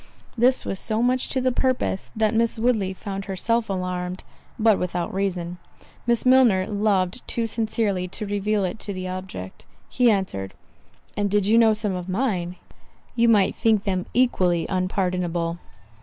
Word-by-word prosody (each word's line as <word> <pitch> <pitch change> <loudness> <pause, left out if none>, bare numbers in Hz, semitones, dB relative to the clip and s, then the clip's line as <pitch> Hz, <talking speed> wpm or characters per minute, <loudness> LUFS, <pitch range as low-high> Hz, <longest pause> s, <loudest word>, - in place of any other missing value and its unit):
This 250 +2 +3
was 195 - -3
so 220 +1 -1
much 250 +1 +1
to 265 - 0
the 255 0 +2
purpose, 255 -6 -1
that 215 -1 +1
Miss 230 0 +2
Woodley 220 -5 +1
found 195 +1 -6
herself 220 +4 -1
alarmed—but 185 +3 -2
without 175 -1 -2
reason—Miss 185 +5 -3
Milner 250 -8 +5
loved 200 -1 0
too 235 - -1
sincerely 215 -4 -1
to 210 +4 -6
reveal 205 0 0
it 185 +4 -4
to 200 - -5
the 185 -1 -5
object. 185 - -7 0.3
He 250 -2 +3
answered, 185 - -1 0.6
"And 205 -1 0
did 205 0 +2
you 215 +3 +3
know 225 -2 +5
some 210 -2 -2
of 180 0 -5
mine, 185 -5 -1 0.6
you 235 -1 +4
might 205 -4 +4
think 220 -3 +2
them 185 -3 -1
equally 185 -9 +2
unpardonable." 180 -2 -1
200 Hz, 150 wpm, -24 LUFS, 185-225 Hz, 0.6 s, Milner